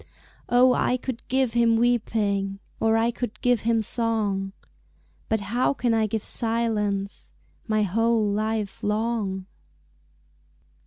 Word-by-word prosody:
Oh, 250 +1 +5
I 250 - +1
could 250 -1 -5
give 260 -2 +1
him 235 -1 +3
weeping, 210 -4 0 0.2
Or 225 0 +3
I 230 +1 +2
could 225 -3 -5
give 245 -2 +2
him 225 -1 +1
song 210 -4 0 0.8
But 220 -1 +1
how 255 +3 +2
can 240 -3 0
I 220 -1 +2
give 220 0 -3
silence, 215 -4 -1 0.3
My 215 -1 +2
whole 225 +3 +1
life 215 0 -2
long? 210 -3 -1
225 Hz, 120 wpm, -25 LUFS, 210-235 Hz, 0.8 s, Oh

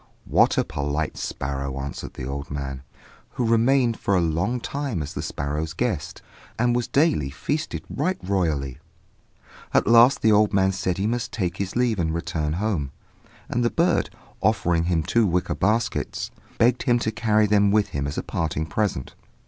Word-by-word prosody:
"What - - +3
a - - +4
polite 75 +2 -2
sparrow!" 70 0 -4
answered 70 +1 -6
the 65 - -5
old 70 +2 -5
man, 70 -2 -4 0.5
who 125 - -1
remained 115 +1 +3
for 100 - +1
a - - +4
long 85 +9 0
time 135 - -3
as 75 - -7
the - - -4
sparrow's 75 +3 -3
guest, 105 -6 -3 0.3
and 120 +1 +2
was 120 -1 0
daily 140 - +2
feasted 150 - -3
right 185 +1 -1
royally. 80 -9 -1 1.0
At - - +4
last 120 +4 +6
the 110 - +5
old 105 0 +4
man 95 0 +3
said 95 -1 -1
that 95 - -4
he - - +1
must 120 +2 -1
take 90 -3 -2
his 100 -1 -3
leave 120 -4 +1
and 80 -1 0
return 80 -2 -2
home; 90 -6 -1 0.6
and 120 - -1
the 120 - +3
bird, 170 +5 +1 0.3
offering 90 -6 +2
him 85 -2 +1
two 115 +5 +2
wicker 90 0 0
baskets, 110 +2 -1 0.3
begged 120 +1 +3
him 120 -3 +3
to 110 -2 -1
carry 110 -1 +2
them 100 -1 +4
with 105 0 +2
him 70 0 -2
as 70 - -5
a - - -1
parting 80 -1 -2
present. 85 -5 -2
95 Hz, 180 wpm, -24 LUFS, 75-115 Hz, 1.0 s, last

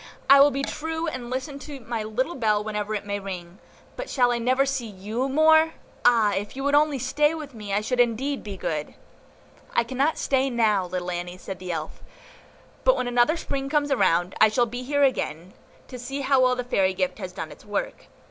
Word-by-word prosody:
"I 275 - +9
will 280 +1 +8
be 275 0 -3
true, 320 +3 -3
and 255 -7 -5
listen 270 +3 -4
to 285 -1 -8
my 230 -2 -4
little 230 +9 -2
bell 215 -6 +1
whenever 210 0 -3
it 205 - -4
may 205 0 -2
ring. 185 -2 -7 0.4
But - - -6
shall 245 -3 +3
I 240 - 0
never 255 +3 +2
see 265 -4 -2
YOU 215 +6 -3
more? 315 +3 +5 0.3
Ah! 225 -4 +4
if 205 +4 -3
you 270 - -4
would 285 +1 +1
only 295 -1 +4
stay 295 +5 +1
with 300 -4 -8
me, 210 -3 -7
I 200 +1 +1
should 250 +3 -2
indeed 245 +4 +1
be 200 -2 -7
good." 150 -4 -3 0.8
"I 235 - +4
cannot 265 +6 0
stay 270 0 +1
now, 215 -6 +2
little 180 0 -3
Annie," 175 +1 -5
said 185 0 -7
the 180 -1 -5
Elf, 165 - -5 0.8
"but - - +4
when 250 - -1
another 245 +7 +3
Spring 275 -3 -3
comes 290 -1 +1
round, 180 -5 +2
I 215 - +8
shall 240 +3 +2
be 245 +2 -6
here 285 +3 +1
again, 185 - -1 0.4
to 250 - -8
see 270 +3 -4
how 270 -1 +3
well 255 0 +4
the 250 - -3
fairy 190 -6 +1
gift 185 +2 -1
has 185 -3 -5
done 165 -4 -6
its - - -14
work. 205 -1 -4
245 Hz, 215 wpm, -25 LUFS, 205-275 Hz, 0.8 s, I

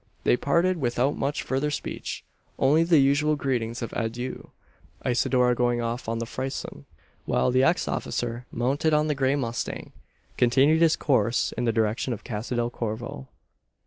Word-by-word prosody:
They - - +4
parted 170 +8 +1
without 130 0 0
much 140 +2 -2
further 135 +3 -1
speech 145 - -5 0.3
only 145 +4 +4
the 165 -1 +4
usual 145 +2 +3
greetings 120 -4 -2
of 115 - -5
adieu 120 +3 -4 0.6
Isidora 125 0 +2
going 120 0 +1
off 115 0 -3
on 115 - -1
the 115 - -3
frison; 135 +3 -5 0.4
while - - +1
the 130 +1 +3
ex 170 +5 +2
officer, 120 0 -3
mounted 145 +5 +1
on 150 +1 +2
the - - +2
grey 135 0 +1
mustang, 120 -4 -4 0.5
continued 135 +6 +4
his 165 -2 +5
course 125 -4 +1
in 120 - -3
the 115 - +3
direction 110 +3 0
of 110 - -8
Casa 115 +2 -4
del 120 0 0
Corvo. 110 - -5
125 Hz, 160 wpm, -26 LUFS, 120-140 Hz, 0.6 s, his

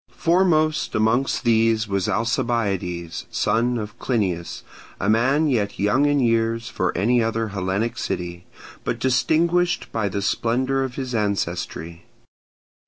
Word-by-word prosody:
Foremost 165 -3 +2
amongst 110 +5 +1
these 115 -1 +2
was 100 -2 -1
Alcibiades, 105 -8 -1
son 120 +4 +1
of 105 -1 -6
Clinias, 95 -9 -2 0.4
a 95 - -1
man 130 +8 +3
yet 110 -8 0
young 115 +9 +2
in 145 0 +2
years 115 -1 +1
for 95 -5 -1
any 120 +5 +3
other 115 0 -1
Hellenic 100 +3 -2
city, 85 0 -4 0.4
but - - -2
distinguished 170 +7 +1
by 110 -3 -1
the 100 +1 -3
splendour 130 +6 0
of 130 -2 -5
his 130 -2 -4
ancestry. 85 -5 -3
115 Hz, 125 wpm, -22 LUFS, 100-130 Hz, 0.4 s, man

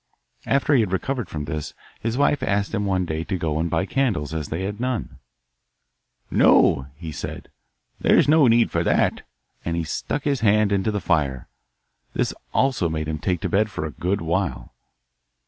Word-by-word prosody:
After 140 +2 +2
he 135 - +5
had 105 -5 +1
recovered 120 +3 -2
from 75 -1 -4
this 75 -1 -5 0.2
his 115 +2 -2
wife 145 0 +2
asked 100 +1 0
him 105 -2 0
one 95 -2 +1
day 80 -1 -3
to 95 - -2
go 80 -3 -1
and 85 +1 0
buy 95 - 0
candles, 100 - -1
as 80 -3 -3
they 85 +4 -3
had 105 +2 -4
none. 125 - -3 1.1
'No,' 65 0 +4
he 80 +1 -7
said, - - -7 0.5
'there's - - +4
no 150 -2 +6
need 115 0 +4
for - - +1
that;' - - +2 0.4
and 85 0 -2
he 85 - 0
stuck 105 - -3
his 140 -3 0
hand 105 -2 +3
into 100 +1 +1
the 105 -2 -2
fire. 70 -8 0 0.7
This - - 0 0.2
also 125 -11 +1
made 80 -1 -3
him 75 -1 -3
take 90 +1 -1
to - - -2
bed 105 +2 +2
for 80 -6 -4
a 80 - -4
good 90 +5 -2
while. 80 -8 -2
95 Hz, 185 wpm, -23 LUFS, 80-115 Hz, 1.1 s, no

